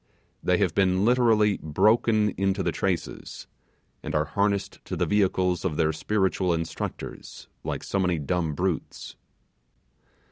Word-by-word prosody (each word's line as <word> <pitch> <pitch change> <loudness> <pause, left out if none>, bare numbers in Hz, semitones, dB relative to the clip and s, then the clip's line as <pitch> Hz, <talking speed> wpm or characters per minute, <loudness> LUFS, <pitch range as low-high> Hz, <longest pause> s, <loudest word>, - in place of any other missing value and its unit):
They 90 - +2
have 95 -5 +1
been 95 +1 +2
literally 115 -4 +3
broken 105 +6 +3
into 95 0 0
the 85 - 0
traces, 90 -1 -3 0.6
and 80 0 -5
are 75 0 +2
harnessed 100 +4 -1
to - - -4
the - - 0
vehicles 95 -3 +1
of 85 -6 -2
their 80 -1 +2
spiritual 95 0 0
instructors 80 0 -6 0.2
like - - -4
so 100 - -2
many 90 -2 +1
dumb 80 +1 -1
brutes! 90 -1 -3
95 Hz, 135 wpm, -26 LUFS, 85-105 Hz, 0.6 s, literally